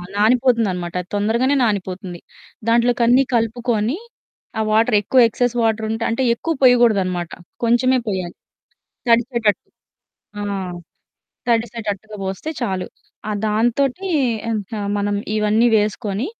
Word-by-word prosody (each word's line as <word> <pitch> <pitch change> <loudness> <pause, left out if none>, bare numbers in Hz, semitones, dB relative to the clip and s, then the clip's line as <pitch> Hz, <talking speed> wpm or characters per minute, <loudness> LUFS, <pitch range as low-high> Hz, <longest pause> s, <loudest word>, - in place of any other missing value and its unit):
నానిపోతుందన్నమాట. 215 -6 +2
అది 180 - -16
తొందరగానే 235 +7 +1
నానిపోతుంది. 185 -4 -3 0.5
దాంట్లోకన్నీ 240 +2 +4
కలుపుకొని 230 +2 0 0.6
ఆ - - +2
వాటర్ 225 +1 +3
ఎక్కువ 255 +6 +2
ఎక్సెస్ 245 +2 -1
వాటరుంటే 225 0 0
అంటే 230 +3 0
ఎక్కువ 325 +8 -2
పోయకూడదన్నమాట. 200 -9 +3 0.3
కొంచెమే 240 +2 +3
పొయ్యాలి. 185 -4 -3 0.7
తడిచేటట్టు. 235 -2 +2 0.7
ఆ! - - -3 1.1
తడిసేటట్టుగా 220 -3 -2
బోస్తే 190 +11 -4
చాలు. 190 -6 -2 0.4
ఆ - - -1 0.2
దాంతోటి 240 - 0 0.4
ఇక 215 -1 -3 0.2
మనం 205 0 -1 0.2
ఇవన్నీ 215 +2 +3
వేసుకొని 210 +2 -1
225 Hz, 100 wpm, -20 LUFS, 205-240 Hz, 1.1 s, దాంట్లోకన్నీ